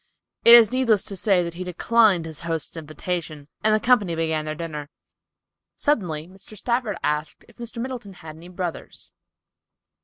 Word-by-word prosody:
It 235 - +10
is 230 -3 +7
needless 245 -6 +2
to 200 - -5
say 190 -2 +2
that 170 -1 -5
he 180 +2 -6
declined 185 0 +3
his 160 -2 -6
host's 165 -1 -3
invitation, 155 -1 -5
and 215 - +4
the - - +2
company 210 -7 +3
began 160 -1 -1
their 155 0 -4
dinner. 150 -3 -6 0.9
Suddenly 175 - -1
Mr. 195 +3 -14
Stafford 235 -3 -1
asked 150 +1 -2
if 235 - -21
Mr. 235 0 -7
Middleton 240 -5 -5
had 160 -3 -11
any 165 +2 -13
brothers. 180 -2 -6
180 Hz, 160 wpm, -23 LUFS, 160-220 Hz, 0.9 s, It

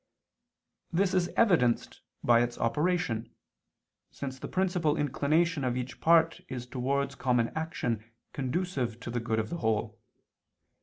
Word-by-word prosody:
This 185 +2 +2
is 180 -2 +2
evidenced 165 - +3 0.2
by 120 -1 +5
its 120 0 -1
operation, 150 -2 0 0.7
since 130 -2 -6
the - - -5
principal 180 -5 +1
inclination 150 +3 +1
of 125 -1 0
each 125 0 -5
part 165 +1 +4
is 125 -2 -5
towards 135 +2 -1
common 125 -3 +1
action 115 -8 -3 0.2
conducive 130 -4 -2
to 120 - -5
the 120 - -1
good 115 -1 -1
of 110 -1 -2
the 170 - -2
whole. 110 -8 -1
135 Hz, 135 wpm, -29 LUFS, 120-170 Hz, 0.7 s, by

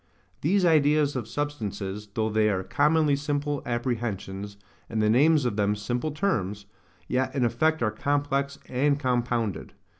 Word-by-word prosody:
These 185 +5 +2
ideas 150 -3 +3
of 120 -4 -3
substances, 105 -7 -4
though 110 -1 0
they 110 0 +3
are 95 -2 -1
commonly 150 +5 +2
simple 145 0 -2
apprehensions, 110 -5 -3 0.3
and 110 - -2
the 105 0 +3
names 145 +4 +4
of 115 -4 -1
them 105 0 +2
simple 120 +8 -2
terms, 105 - -1 0.4
yet 130 +1 -1
in 130 -3 +2
effect 140 +5 +1
are 110 - +1
complex 140 +3 -1
and 140 +3 +1
compounded. 120 -5 -1
125 Hz, 145 wpm, -26 LUFS, 110-145 Hz, 0.4 s, names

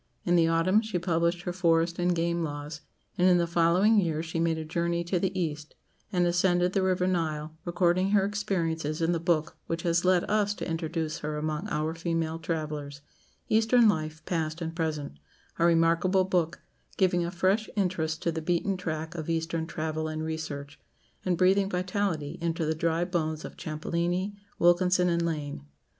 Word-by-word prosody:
In 175 - +3
the 165 -1 +4
autumn 165 +6 +3
she 220 -5 -3
published 170 0 0
her 175 - -3
"Forest 170 -1 +2
and 175 0 +2
Game 170 0 0
Laws"; 150 0 -5 0.4
and 180 - +5
in 180 -1 +6
the 170 - +2
following 175 +6 +4
year 160 -4 0
she 165 0 -3
made 165 -1 +1
a 160 - -4
journey 170 +2 -1
to 175 +1 0
the 185 +1 -1
East, 150 -3 -4 0.4
and 180 -2 +2
ascended 175 +1 +2
the 195 - +2
river 185 -1 +1
Nile, 160 -4 -1
recording 175 +2 +2
her 200 -1 +3
experiences 165 -7 -1
in 165 +1 +1
the 170 - 0
book 165 -1 0
which 165 0 -3
has 170 0 +2
led 185 -1 +4
us 205 -1 +1
to - - -5
introduce 160 -1 -2
her 150 0 -3
among 155 +5 -2
our 155 0 -1
female 165 -1 -2
travellers 150 -3 -4 0.5
"Eastern 225 +2 +4
Life, 155 -4 -1
Past 160 -2 -2
and 165 -1 -4
Present," 155 - -3 0.4
a 170 - +4
remarkable 170 +3 +3
book, 175 -3 -1 0.3
giving 180 -2 +3
a 170 - -2
fresh 190 +5 +1
interest 175 -5 -1
to 170 - +1
the 160 0 -4
beaten 175 +4 0
track 160 -2 -4
of 165 -2 -5
Eastern 165 0 -1
travel 155 -1 -3
and 155 0 -4
research, 150 -3 -5 0.4
and 180 -2 0
breathing 195 +2 +3
vitality 185 -5 -2
into 165 -1 -1
the 155 - +1
dry 165 +2 0
bones 160 -3 -2
of - - -9
Champollini, 170 +5 -2 0.2
Wilkinson, 180 +1 +4
and 170 0 +1
Lane. 145 - -4
170 Hz, 180 wpm, -28 LUFS, 160-180 Hz, 0.5 s, in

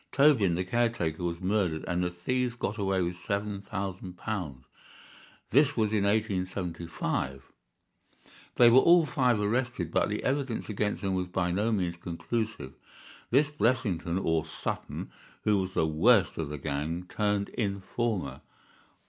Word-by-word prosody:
Tobin, 130 - +4
the 90 - 0
caretaker, 105 -7 0
was 85 0 -2
murdered, 95 -5 0
and 90 0 0
the 90 - 0
thieves 125 +8 -1
got 110 -2 -3
away 95 -2 +1
with 90 +1 -3
seven 100 +1 -3
thousand 95 -3 -5
pounds. 80 -13 -4 0.9
This 145 0 +4
was 110 -1 +1
in 100 -2 +2
1875. 90 - -2 1.1
They 120 - +7
were 125 - +8
all 170 +2 +6
five 125 -6 +2
arrested, 105 -5 -1
but - - +2
the 105 - -3
evidence 135 -5 -1
against 105 0 -1
them 95 -1 0
was 90 -1 -1
by 90 0 -1
no 105 +6 +1
means 90 -5 -1
conclusive. 90 - -4 0.6
This 145 +4 +3
Blessington 110 - 0
or 80 -4 +1
Sutton, 80 - -5 0.3
who 105 -2 +3
was 95 0 -3
the - - +3
worst 95 +7 +4
of 80 -3 -2
the 75 - -4
gang, 75 +5 -3
turned 105 0 0
informer. 100 - -2
100 Hz, 145 wpm, -29 LUFS, 85-115 Hz, 1.1 s, were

